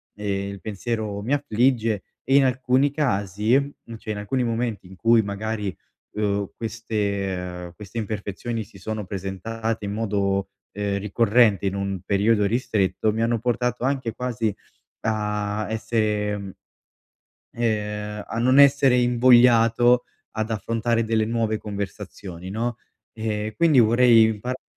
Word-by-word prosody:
eh, 100 -1 -2
il 100 -1 -7
pensiero 110 -1 -3
mi 130 - -1
affligge 120 -6 +1 0.2
e 135 - +2
in 140 - +7
alcuni 130 +2 +2
casi 105 - -1 0.5
cioè, 110 -1 -5
in 105 - -5
alcuni 125 +5 -1
momenti 115 -4 -2
in 95 - -13
cui 115 +3 +4
magari, 105 -1 -3 0.4
uhm, 100 -1 -1
queste 100 -6 -3
queste 105 +3 -10
imperfezioni 110 +2 -4
si 100 -1 -16
sono 110 +2 -4
presentate 105 +3 -4
in 100 - -3
modo, 100 -3 -1 0.2
ehm, 100 0 -2
ricorrente 105 0 +3
in 95 - 0
un 100 -1 -2
periodo 105 +1 +2
ristretto, 110 -2 0
mi 110 +1 0
hanno 115 0 +1
portato 125 +1 -1
anche 130 -4 -1
quasi 115 -4 -2 0.5
a 105 -1 -1
essere, 105 -2 0
mhmm, 100 -1 -7 1.0
uhm 105 -2 -2
a 115 - -4
non 130 +3 +4
essere 140 -2 +6
invogliato 120 0 +5 0.3
ad 110 +1 -2
affrontare 115 +1 0
delle 110 -1 +1
nuove 115 -1 0
conversazioni 100 -3 -7
no. 115 +3 -2 0.4
E 110 -1 -3
quindi 160 -6 +5
vorrei 120 0 +6
imparare 115 +4 -3
110 Hz, 130 wpm, -24 LUFS, 100-120 Hz, 1.0 s, in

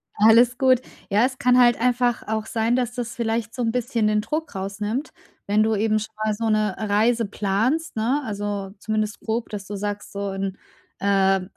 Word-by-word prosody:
Alles 230 +4 +5
gut. 260 -1 +4 0.3
Ja, 210 +3 +4
es 260 0 -3
kann 250 -3 +4
halt 240 -1 +5
einfach 245 0 +1
auch 220 0 -2
sein, 225 +1 0
dass 245 -1 -1
das 240 -2 -4
vielleicht 225 -1 -2
so 250 - -4
‘n 225 - +1
bisschen 235 -2 0
den 210 0 +2
Druck 310 +4 -4
rausnimmt, 205 +8 -3 0.4
wenn 210 +1 +3
du 220 0 +1
eben 215 +1 +1
schon 215 - -7
mal 215 - +1
so 225 +2 -3
'ne 215 -3 +1
Reise 220 +3 +2
planst, 220 +11 -1
ne, 240 +7 +1
also 205 -2 -4
zumindest 215 0 -2
grob, 225 +1 -3
dass 205 -2 -6
du 205 - -6
sagst: 205 +1 -4
„So 200 0 -3
in 195 0 -4 0.4
äh, 195 -1 +3
220 Hz, 190 wpm, -23 LUFS, 205-240 Hz, 0.4 s, Alles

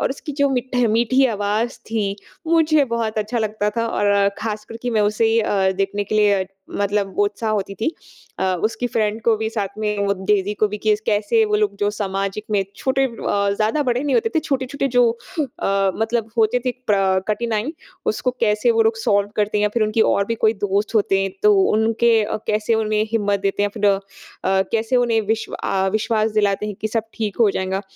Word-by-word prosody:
और - - 0
उसकी 285 +2 -6
जो 280 - +4
मीठे 250 -1 0
मीठी 255 +3 +3
आवाज़ 210 +4 -1
थी, 205 -3 -1 0.3
मुझे 315 -3 +3
बहुत 220 -2 -1
अच्छा 215 +3 -2
लगता 210 -1 -1
था। 230 - +1
और 200 -1 +2
ख़ासकर 215 0 -5
कि 245 - -1
मैं 220 - +2
उसे 225 +1 +2
अ, 195 -3 +1
देखने 200 +1 -1
के 210 - -4
लिए 205 -3 +3 0.3
मतलब 200 -1 0
वो 205 - +3
उत्साह 210 +2 -2
होती 200 -2 -2
थी। 220 +8 -1 0.5
अ, - - 0 0.2
उसकी 230 +3 -1
फ्रेंड 220 -1 -1
को 225 0 +3
भी 220 0 -2
साथ 205 -4 -2
में 210 -1 -1
वो 200 - +2
डेज़ी 205 -1 +2
को 215 - +2
भी 210 +1 -5
कि 215 0 +2
कैसे 215 - +2
वो 425 -1 +1
लोग 420 -1 0
जो 205 - +1
सामाजिक 195 0 -3
में 205 -2 +2
छोटे 270 0 +1
अ, 260 - -1 0.4
ज़्यादा 220 +8 +1
बड़े 250 +1 0
नहीं 290 - 0
होते 455 -1 +2
थे। 320 - +3
छोटे-छोटे 275 -2 -2
जो 245 -2 +4 0.3
अ, 195 -7 0
मतलब 225 0 -1
होते 225 +3 +3
थे - - +3 0.2
प्रा 195 -2 +2
कठिनाई 225 +4 -1 0.3
उसको 250 - 0
कैसे 215 +1 +2
वो 225 0 +3
लोग 225 0 +1
सॉल्व 205 -2 +1
करते 210 0 +1
या 210 - +3
फिर 230 - +2
उनकी 215 +1 0
और 200 - +2
भी 230 - -1
कोई 220 0 +2
दोस्त 205 +2 -1
होते 195 -2 +2
हैं, 195 0 -1
तो 210 -1 +7
उनके 225 +1 +3
अ, - - -2
कैसे 215 +2 +1
उन्हें 215 -1 +1
हिम्मत 205 -3 +1
देते 195 +1 0
हैं 205 - +2
या 215 - -7
फिर 210 - +3 0.6
अ, 190 0 +3
कैसे 225 +2 +1
उन्हें 235 -2 +2
विश्व 220 +1 -2
अ, 190 0 -1
विश्वास 215 0 +1
दिलाते 210 -1 +1
हैं 210 - -4
कि 215 - 0
सब 225 0 -1
ठीक 215 -3 -3
हो 215 - +5
जाएगा। 190 +1 -2
215 Hz, 210 wpm, -21 LUFS, 205-230 Hz, 0.6 s, तो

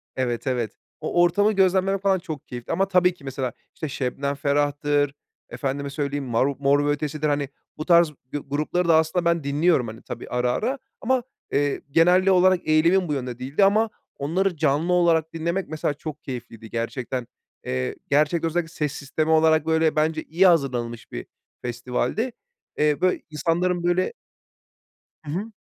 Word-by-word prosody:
Evet, 125 0 -2
evet. 120 -4 -1 0.3
O 175 - +1
ortamı 205 +5 +4
gözlemlemek 190 0 +2
falan 195 -2 +2
çok 155 -4 -7
keyifli. 120 +2 -7
Ama 190 +3 +1
tabii 180 -1 +3
ki 145 - -20
mesela, 135 -2 -3 0.2
işte, 155 -4 -4
Şebnem 135 +2 -2
Ferah'tır, 145 0 +1 0.4
efendime 140 0 -3
söyleyeyim, 140 -1 -3
mar 120 +1 +1
Mor 145 +1 +3
ve - - +1
Ötesi'dir, 150 +1 -1
hani, 145 -1 0 0.3
bu 155 - -4
tarz 170 -3 +5 0.2
g - - 0
grupları 150 +5 -1
da 165 - +6
aslında 160 +2 +2
ben 170 -3 +2
dinliyorum, 145 -2 +2
hani, 110 +1 -9
tabii, - - -8
ara 125 0 +1
ara 255 - -1 0.2
ama, 255 0 +1 0.3
eee, 145 0 +1
genel 180 +4 +4
olarak 185 -1 +4
eğilimim 170 +4 +4
bu 150 - -1
yönde 125 -3 -4
değildi 140 +10 +1
ama 215 +3 +3 0.3
onları 175 +5 0
canlı 155 +4 +1
olarak 165 -2 +3
dinlemek 170 +4 -2
mesela, 155 -2 -1
çok 150 +1 -8
keyifliydi 115 -4 -8
gerçekten. 120 +1 -3 0.4
Eee, 65 0 -2
gerçekten 155 +3 +2
özellikle, 165 0 -2
ses 150 -2 -2
sistemi 155 +3 -2
olarak, 160 -1 +4
böyle, 160 -1 +2
bence 155 +1 +1
iyi 180 +4 +3
hazırlanılmış 125 -8 0
bir - - -6 0.4
festivaldi. 125 - -2 0.5
Eee, 150 -1 +3
böyle, 185 0 +2
insanların, 175 +3 0
böyle 175 - +1 1.1
Hı 145 - -5
hı. 205 +7 -3
155 Hz, 160 wpm, -24 LUFS, 140-175 Hz, 1.1 s, da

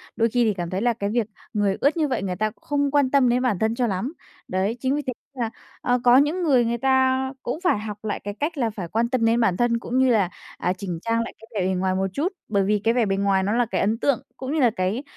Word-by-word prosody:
đôi 230 0 +2
khi 240 +1 +2
thì 215 -2 +2
cảm 175 -2 -4
thấy 190 +3 -2
là 240 0 +2
cái 200 -2 -3
việc 225 -1 0 0.3
người 205 -2 +1
ướt 290 +4 +3
như 310 -2 +2
vậy 250 -7 -2
người 185 -2 -2
ta 215 +3 -1
không 285 -1 0
quan 285 -2 +3
tâm 275 -3 +4
đến 245 +1 +2
bản 240 -8 0
thân 220 +1 +1
cho 245 -1 +1
lắm. 200 - -2 0.3
Đấy, 195 +6 -1
chính 265 +3 0
vì 295 - -1
thế 255 -3 -4 0.2
nên 255 - -5
là, 225 - -1 0.3
ờ, 245 0 +1
có 245 0 +7
những 305 +6 +2
người 260 -7 +4
người 235 +1 0
ta 265 +1 +2
cũng 275 +7 -3
phải 355 - +2
học 210 -1 -6
lại 210 - -2
cái 205 - -4
cách 300 +2 -2
là 240 -4 +1
phải 195 -5 -6
quan 230 +5 0
tâm 250 -3 +1
đến 230 +1 +3
bản 190 -6 +2
thân 240 -1 +2
cũng 245 +1 -3
như 260 0 +4
là, 205 -6 +3 0.3
à, 180 - 0
chỉnh 180 -3 -5
trang 230 +2 0
lại - - -7
cái 225 - -15
vẻ 185 - +1
bề 190 - +1
ngoài 185 0 0
một 190 +1 0
chút, 315 - 0 0.2
bởi 200 -2 +1
vì 210 +2 +1
cái 230 - +3
vẻ 240 -3 +2
bề 195 -1 0
ngoài 195 -1 +2
nó 200 - 0
là 240 +1 +2
cái - - -2
ấn 220 +3 +1
tượng 275 +1 +1 0.2
cũng 265 +2 -4
như 315 - +1
là 245 - +5
cái, 190 +8 -1
230 Hz, 295 wpm, -24 LUFS, 200-260 Hz, 0.3 s, có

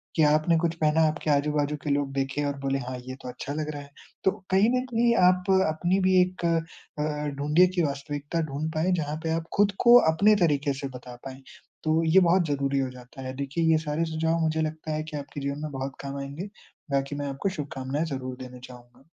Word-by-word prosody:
कि 160 - +4
आपने 155 +3 +4
कुछ 170 0 0
पहना 155 +1 +3
आपके 155 0 -2
आजू-बाजू 145 +1 +1
के - - -3
लोग 140 -1 0
देखे 135 +1 -1
और 140 -1 -2
बोले 135 0 -1
हाँ, 125 -1 -5
ये 130 - -5
तो 125 - -7
अच्छा 130 +3 -6
लग 155 0 -3
रहा 145 -1 -6
है। 140 - -13 0.3
तो 190 - +4 0.2
कहीं 195 +4 +4
ना 255 - +3
कहीं 235 0 +3
आप 185 +1 +2 0.2
अपनी 175 +5 +1
भी 185 0 +3
एक 180 -1 -1
अ 170 - +3 0.5
अ, 150 -1 -2
ढूँढ़िए 150 +6 +4
कि 175 - +2
वास्तविकता 145 +3 -3
ढूँढ 155 +3 -3
पाए 165 +4 +1
जहाँ 150 0 -3
पे 160 - -1
आप 165 0 -1
ख़ुद 205 0 +4
को 240 +1 +9 0.2
अपने 210 +6 +5
तरीके 145 -3 +2
से - - -1
बता 125 0 -11
पाएँ। 135 0 -8 0.4
तो 160 +1 +2
ये 190 - +8
बहुत 175 -1 +3
ज़रूरी 140 -1 0
हो 135 -1 -1
जाता 125 +1 -12
है, 130 0 -5
देखिए 140 +4 -2
ये 160 - +5
सारे 155 +3 0
सुझाव 160 +1 0
मुझे 160 0 +1
लगता 155 0 -3
है 155 - -2
कि 155 -1 -6
आपके 145 0 -7
जीवन 140 +1 -3
में 155 - -4
बहुत 135 0 -5
काम 140 0 -5
आएँगे। 145 +9 -6 0.4
बाकी 140 +1 0
मैं 145 0 -3
आपको 140 +8 -2
शुभकामनाएँ 140 +1 -3
ज़रूर 130 -4 -5
देना 125 -1 -9
चाहूँगा। 125 0 -14
150 Hz, 220 wpm, -26 LUFS, 140-165 Hz, 0.5 s, को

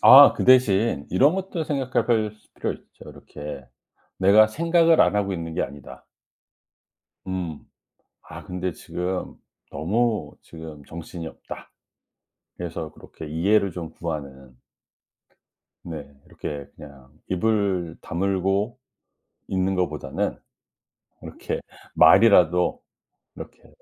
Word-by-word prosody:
아 140 +2 +10
그 - - -2
대신 115 - +4
이런 140 - +4
것도 190 -3 -3
생각해 135 -4 -1
벌 110 -3 +1
스 105 - -27
필요 - - -2
있죠. - - -15
이렇게 75 -2 -9 0.5
'내가 100 +3 +6
생각을 165 +5 +3
안 90 +3 +4
하고 100 -1 0
있는 80 -2 -5
게 - - 0
아니다.' 70 -1 -9 1.2
음 90 -5 -4 0.6
'아 - - -11
근데 90 0 -3
지금 90 +3 -4 0.4
너무 105 +10 -1
지금 80 -3 -11
정신이 85 0 -8
없다.' - - -10 0.9
그래서 80 -2 -5
그렇게 80 - -11
이해를 95 +4 +2
좀 85 -2 -6
구하는. 70 -6 -7 1.3
네. 80 -4 -7 0.2
이렇게 70 -1 -6
그냥 70 -2 -14 0.2
입을 95 -3 0
다물고 95 +6 -1 0.7
있는 95 0 0
거보다는 75 -6 -2 0.9
이렇게 - - -5 0.4
말이라도 90 -5 +5 0.6
이렇게 - - -10
하 - - -19
90 Hz, 225 characters per minute, -24 LUFS, 80-110 Hz, 1.3 s, 아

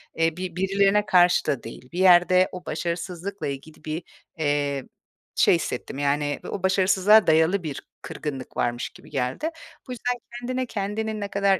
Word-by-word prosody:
eee, 165 +1 +1
bi 185 -2 -5
birilerine 195 +2 +2
karşı 180 -2 +4
da 135 - -1
değil. 125 +2 -10
Bir 175 - -5
yerde 185 0 +6
o 180 -1 -9
başarısızlıkla 175 +4 -4
ilgili 140 +3 -7
bir, 155 +2 -3 0.4
eee, 145 -2 0 0.5
şey - - +5
hissettim, - - -4
yani, 145 0 0
o 195 - -5
başarısızlığa 190 +2 +4
dayalı 160 +4 +3
bir 145 -4 -5 0.2
kırgınlık 135 -4 -6
varmış 120 0 -1
gibi - - -16
geldi. 130 - -2 0.4
Bu - - -7
yüzden 245 0 -2 0.2
kendine 255 +1 -2
kendinin 215 0 -3
ne 205 - -2
kadar 200 -1 +2
180 Hz, 155 wpm, -25 LUFS, 150-200 Hz, 0.5 s, yerde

